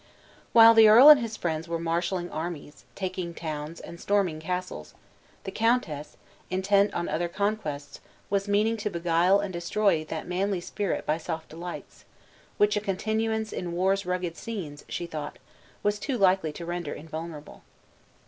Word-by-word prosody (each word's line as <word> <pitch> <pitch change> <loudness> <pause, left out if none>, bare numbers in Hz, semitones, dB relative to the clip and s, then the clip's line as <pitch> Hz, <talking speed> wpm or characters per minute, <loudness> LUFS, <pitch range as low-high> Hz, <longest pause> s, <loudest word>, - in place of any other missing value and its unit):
While 230 0 +9
the 225 -1 +8
earl 245 +7 +9
and 300 -2 +10
his 230 -2 -4
friends 160 -1 -3
were 165 0 -2
marshaling 170 +2 -2
armies, 155 -2 -6
taking 185 -3 -4
towns, 155 0 -5
and 170 +1 -10
storming 195 -6 +1
castles, 180 - -5 0.5
the 195 - -5
countess, 220 - -1 0.3
intent 200 +2 +2
on 170 - -2
other 165 +3 -1
conquests, 170 -7 -3 0.3
was 200 0 -1
meaning 210 +3 +2
to 210 0 -2
beguile 170 +2 +2
and 200 -2 -4
destroy 170 0 +1
that 160 0 -5
manly 190 +2 -1
spirit 200 +2 -3
by 155 +2 0
soft 160 -1 -5
delights, 170 +2 -9 0.5
which 210 +1 +3
a 210 - 0
continuance 220 +2 -1
in 175 -1 -4
war's 190 +3 +1
rugged 180 -2 -3
scenes, 170 -11 -7
she 175 - -3
thought, 155 -3 -6 0.5
was 205 0 +1
too 260 +4 -2
likely 185 -5 +3
to 170 +3 -8
render 175 -3 -4
invulnerable. 160 0 -8
180 Hz, 155 wpm, -27 LUFS, 165-205 Hz, 0.5 s, and